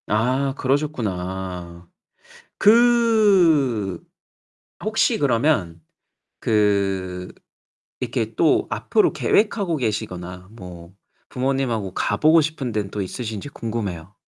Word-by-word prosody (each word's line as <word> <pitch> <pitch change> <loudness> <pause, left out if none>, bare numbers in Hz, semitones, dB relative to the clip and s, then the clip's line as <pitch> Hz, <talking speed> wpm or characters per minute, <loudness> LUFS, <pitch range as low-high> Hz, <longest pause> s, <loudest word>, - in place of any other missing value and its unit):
아 130 +6 +1
그러셨구나. 95 - -3 0.7
그 200 - +4 0.9
혹시 220 +1 +1
그러면 115 - +1 0.6
그 95 -4 0 0.7
이렇게 - - -3
또 - - +2
앞으로 - - +1
계획하고 200 -6 +1
계시거나 90 -6 -4
뭐 90 -5 -11 0.4
부모님하고 125 -7 -1
가 - - -1
보고 160 +2 +5
싶은 150 -5 -3
데는 105 -2 -3
또 105 - -3
있으신지 110 +5 -5
궁금해요. 105 - -5
110 Hz, 210 characters per minute, -22 LUFS, 95-150 Hz, 0.9 s, 보고